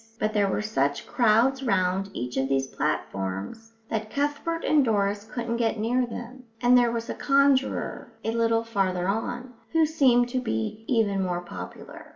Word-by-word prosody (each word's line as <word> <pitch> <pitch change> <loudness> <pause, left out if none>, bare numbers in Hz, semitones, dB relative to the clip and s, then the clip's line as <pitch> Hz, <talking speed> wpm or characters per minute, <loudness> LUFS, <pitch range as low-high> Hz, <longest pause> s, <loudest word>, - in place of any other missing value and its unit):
But 215 0 0
there 205 -2 +3
were 210 - -1
such 140 -9 0
crowds 240 +4 +3
round 195 -4 +1
each 125 +1 -4
of 135 0 0
these 135 -1 +1
platforms 135 - -3 0.2
that 220 -1 -2
Cuthbert 290 +5 -2
and 300 -2 +4
Doris 205 -2 0
couldn't 235 -1 -2
get 225 -1 0
near 240 +4 +1
them; 245 +2 -8
and 245 +1 +5
there 245 -1 +5
was 230 0 -3
a - - -3
conjurer, 275 -1 +1
a 225 - -1
little 230 0 +1
farther 190 -5 -1
on, 240 +5 -3 0.2
who 325 -1 +5
seemed 255 -6 +3
to 255 +1 -1
be 110 - -3
even 210 -5 +2
more 180 -1 -1
popular. 90 - -9
225 Hz, 170 wpm, -26 LUFS, 185-245 Hz, 0.2 s, and